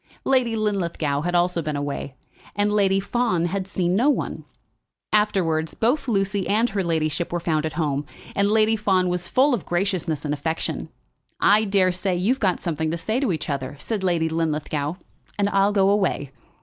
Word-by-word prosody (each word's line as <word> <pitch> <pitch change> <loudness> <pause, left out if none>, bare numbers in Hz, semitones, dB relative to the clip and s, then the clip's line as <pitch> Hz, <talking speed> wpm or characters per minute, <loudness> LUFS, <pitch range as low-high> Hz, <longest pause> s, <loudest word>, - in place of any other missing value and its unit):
Lady 250 -4 +2
Linlithgow 170 -9 -1
had 175 +2 -1
also 175 0 +2
been 155 -1 -3
away, 145 -1 -4 0.4
and 205 0 +1
Lady 195 -2 +3
Fawn 200 -4 0
had 190 +2 -2
seen 180 -2 0
no 245 +8 +3
one. 290 - -2 0.7
Afterwards, 175 -7 +1
both 250 +6 +1
Lucy 195 -3 0
and 225 +4 +2
her 195 -1 -1
ladyship 160 -1 -1
were 175 - -1
found 160 -2 0
at 155 - -6
home, 150 -3 -1 0.3
and 200 0 +2
Lady 220 +1 +3
Fawn 190 -4 +1
was 180 -1 -2
full 270 +8 +3
of 230 - -1
graciousness 175 -4 -1
and 145 - 0
affection. 160 +3 -3 0.5
"I 210 +2 +4
daresay 185 -1 +1
you've 215 +10 +1
got 190 -4 +1
something 160 -2 -2
to 165 - -2
say 220 +8 -1
to 265 -7 +1
each 155 -3 -3
other," 140 -2 -3
said 205 +6 -4
Lady 170 -3 +1
Linlithgow, 155 -1 -2 0.4
"and 200 -1 +2
I'll 195 0 +3
go 195 -2 +3
away." 185 -9 0
185 Hz, 175 wpm, -23 LUFS, 160-205 Hz, 0.7 s, I